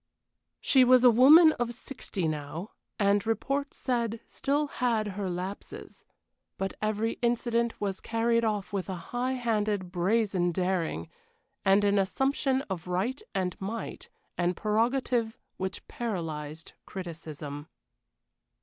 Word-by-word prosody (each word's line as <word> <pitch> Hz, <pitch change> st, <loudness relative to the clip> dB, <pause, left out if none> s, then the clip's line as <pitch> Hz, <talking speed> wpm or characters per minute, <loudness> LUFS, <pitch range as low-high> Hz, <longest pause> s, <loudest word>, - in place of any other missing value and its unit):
She 260 Hz, -2 st, +5 dB
was 255 Hz, 0 st, +6 dB
a 250 Hz, -, +9 dB
woman 300 Hz, +8 st, +8 dB
of 240 Hz, -1 st, -1 dB
sixty 220 Hz, -9 st, -4 dB
now, 155 Hz, +5 st, -4 dB, 0.3 s
and, 200 Hz, -1 st, +3 dB
report 275 Hz, +5 st, -1 dB
said, 235 Hz, -3 st, -1 dB
still 290 Hz, +2 st, 0 dB
had 235 Hz, -6 st, 0 dB
her 195 Hz, -1 st, -3 dB
lapses. 180 Hz, +3 st, -7 dB, 0.5 s
But 195 Hz, 0 st, -2 dB
every 215 Hz, +1 st, -1 dB
incident 235 Hz, -1 st, 0 dB
was 195 Hz, -2 st, -2 dB
carried 230 Hz, 0 st, +1 dB
off 210 Hz, -3 st, -1 dB
with 195 Hz, -1 st, -2 dB
a 190 Hz, -, -2 dB, 0.2 s
high 250 Hz, +2 st, 0 dB
handed, 210 Hz, -6 st, -1 dB
brazen 185 Hz, -1 st, +1 dB
daring, 175 Hz, -, -1 dB, 0.6 s
and 195 Hz, +1 st, +4 dB
an 205 Hz, 0 st, +3 dB
assumption 270 Hz, +6 st, +1 dB
of 185 Hz, -, -6 dB
right 195 Hz, -, -1 dB
and 180 Hz, -2 st, 0 dB
might 225 Hz, -, -5 dB, 0.3 s
and 175 Hz, +1 st, +1 dB
prerogative 230 Hz, +1 st, +1 dB, 0.2 s
which 190 Hz, 0 st, -5 dB
paralyzed 160 Hz, -8 st, -5 dB
criticism. 155 Hz, -5 st, -7 dB
210 Hz, 120 wpm, -29 LUFS, 185-240 Hz, 0.6 s, a